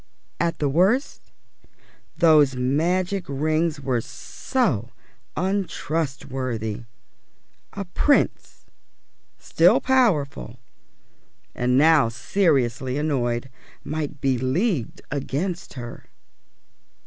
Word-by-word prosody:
At 170 0 0
the 145 - 0
worst 190 - +1 0.9
those 150 -5 +5
magic 175 +9 0
rings 155 +2 0
were 130 -4 -1
so 130 - -2 0.5
untrustworthy! 135 - -2 0.9
a 200 - -5
Prince, 280 +10 0 0.7
still - - +3
powerful, 165 - +1 1.0
and 125 +1 +1
now 150 -4 +5
seriously 130 - 0
annoyed, 130 -4 -1 0.3
might 150 -1 -4
be 130 -2 +1
leagued 140 - -1
against 150 +6 -3
her. 120 -2 -8
145 Hz, 75 wpm, -23 LUFS, 130-175 Hz, 1.0 s, those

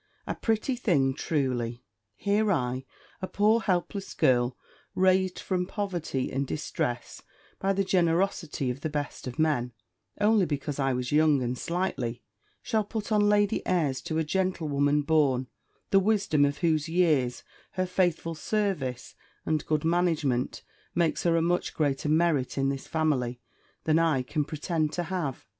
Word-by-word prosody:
A - - -2
pretty 225 +3 0
thing, 145 - +2
truly! 125 -5 -2 0.3
Here 205 - +1
I, 130 -5 -1 0.4
a 185 - -2
poor 215 +4 +3
helpless 195 -1 -2
girl, 125 -1 +2 0.4
raised 185 0 +3
from 180 -1 -2
poverty 175 - -3
and 135 +1 -1
distress 120 -5 -3 0.4
by 195 +1 +1
the 195 0 +1
generosity 170 -6 +1
of 130 +3 -7
the 155 - -2
best 145 -3 -4
of 125 - -6
men, 145 -6 +1 0.5
only 210 -3 +4
because 145 -1 -3
I 135 -1 +2
was 125 -1 -2
young 150 -3 +4
and 120 +1 -1
sightly, 130 -7 -2 0.4
shall 220 -1 +1
put 215 +1 -5
on 205 -1 +4
lady 205 -1 +2
airs 155 -8 +1
to 160 - -1
a 160 - +2
gentlewoman 150 -5 +1
born, 140 -4 +2 0.5
the 195 - +6
wisdom 195 -8 +2
of 140 0 -1
whose 160 -1 +1
years, 155 -8 +2 0.3
her 185 0 0
faithful 175 -2 0
services, 160 - -2 0.3
and 155 -1 0
good 155 0 0
management, 160 -7 +1 0.3
make 170 -2 +1
her 170 -1 +2
a 165 - +2
much 175 +1 0
greater 145 -1 0
merit 155 -6 +2
in 135 0 +2
this 135 -1 -4
family, 135 -7 0 0.4
than 160 0 +3
I 160 -6 +2
can 150 +3 -1
pretend 155 0 -2
to 175 - -1
have! 170 -7 -3
160 Hz, 150 wpm, -28 LUFS, 135-185 Hz, 0.5 s, the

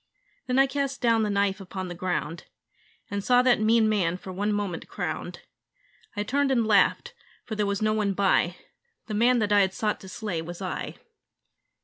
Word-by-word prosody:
Then 250 0 0
I 270 - +6
cast 275 0 -2
down 230 -2 +3
the 215 - 0
knife 200 0 0
upon 190 0 -6
the 175 - -6
ground 175 -2 -3 0.7
And 200 0 -2
saw 250 +2 +4
that 245 -4 +3
mean 220 0 +4
man 185 -5 +1
for 185 0 -9
one 205 +3 -1
moment 205 -5 -3
crowned. 175 -1 -5 0.7
I 205 - -1
turned 275 +5 +1
and 240 -4 +2
laughed: 215 - +3 0.3
for 220 - -6
there 210 -1 0
was 200 +1 -1
no 215 0 +2
one 210 -2 0
by 190 -2 +2 0.5
The 215 - -6
man 240 +4 +4
that 210 -3 0
I 205 - +6
had 190 -1 +2
sought 210 -1 -1
to 190 - -11
slay 185 -4 -4
was 175 +1 -8
I. 185 -2 -4
205 Hz, 195 wpm, -26 LUFS, 185-230 Hz, 0.7 s, I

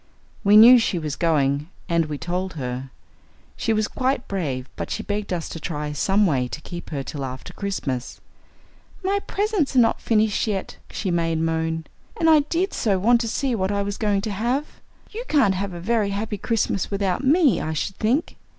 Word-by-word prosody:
We 205 0 +6
knew 240 +3 +10
she 220 -5 0
was 155 -3 -3
going, 150 -2 +1 0.2
and 170 -3 +1
we 150 -1 -4
told 180 +4 -3
her. 130 -3 -5 0.7
She - - -1
was 215 -1 +1
quite 260 0 -1
brave, 140 -10 -3
but - - -5
she 220 - -3
begged 205 -1 -3
us 170 -3 -2
to 165 - -6
try 150 -2 -4
some 195 +8 +2
way 130 -8 +1
to 150 - -7
keep 175 +2 -8
her 140 -3 -3
till 140 0 -5
after 130 -1 -7
Christmas. 140 -11 -4 0.8
'My 395 +2 +1
presents 405 -9 0
are - - +6
not 225 -1 +3
finished 220 -1 +1
yet,' 200 -3 -3
she 190 - -3
made 165 -1 +1
moan. 160 0 -1 0.3
'And 325 -1 +5
I 310 - +7
did 335 +6 -1
so 200 -4 +1
want 235 +5 +4
to 230 - -2
see 260 +3 -1
what 190 -3 0
I 200 0 0
was 200 0 -4
going 205 -3 +1
to 215 +1 -3
have. 240 +9 -2 0.3
You 455 +3 -5
can't 265 -10 +3
have 195 +1 -3
a - - -6
very 210 +2 +1
happy 205 +1 -3
Christmas 210 -4 0
without 200 +2 -1
me, 295 0 +4
I 155 +1 -2
should 190 +5 -3
think. 255 +10 0
200 Hz, 195 wpm, -23 LUFS, 160-230 Hz, 0.8 s, knew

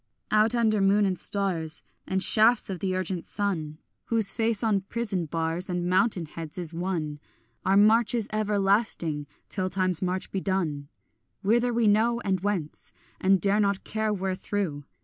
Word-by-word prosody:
Out 215 +2 +3
under 220 -3 +2
moon 200 +1 +4
and 185 -3 -1
stars 175 -7 -2 0.2
And 190 0 0
shafts 220 -1 +4
of 185 - -5
the 185 0 -1
urgent 185 -1 -3
sun 165 -7 -2 0.3
Whose 225 -3 +2
face 225 -1 0
on 210 -3 +2
prison 195 -4 -3
bars 165 +3 -2
And 180 -1 -2
mountain 185 -1 +2
heads 160 +1 -8
is 175 -2 -4
one, 165 -4 -3 0.5
Our 195 +1 +4
march 215 +2 +4
is 225 -3 -1
everlasting 200 -7 +1 0.2
till 185 -1 -2
time's 185 -2 0
march 185 0 -2
be 195 - -2
done. 165 -8 -2 0.6
Whither 240 +4 +2
we 235 -1 +1
know, 225 +3 +3
and 190 -3 0
whence, 185 -6 -3 0.3
And 190 0 +3
dare 200 +2 +2
not 200 -2 +1
care 220 0 -1
wherethrough. 190 -5 -3
195 Hz, 160 wpm, -27 LUFS, 175-215 Hz, 0.6 s, moon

